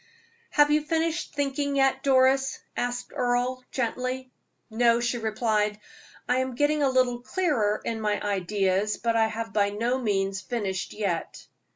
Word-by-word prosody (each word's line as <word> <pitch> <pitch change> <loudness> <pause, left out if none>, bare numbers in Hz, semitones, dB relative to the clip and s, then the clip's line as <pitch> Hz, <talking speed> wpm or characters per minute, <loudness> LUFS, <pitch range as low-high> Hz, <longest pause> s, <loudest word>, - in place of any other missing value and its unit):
"Have 295 0 +4
you 300 +1 +4
finished 325 +1 -1
thinking 285 0 -1
yet, 270 -1 +2
Doris?" 265 0 +3 0.2
asked 245 0 -3
Earle, 250 +1 0
gently. 255 +1 -3 0.4
"No," 235 +1 +3
she 240 0 -1
replied. 215 -1 0 0.5
"I 250 - +2
am 260 -1 -1
getting 295 +3 +2
a 275 - +3
little 255 -2 +2
clearer 245 - 0
in 225 -1 -2
my 210 -1 0
ideas, 200 0 0
but 230 -1 0
I 225 -1 +4
have 225 0 -5
by 205 -1 +3
no 235 +5 -1
means 195 -4 -1
finished 200 -7 -3
yet." 195 -6 -3
245 Hz, 150 wpm, -26 LUFS, 210-265 Hz, 0.5 s, Have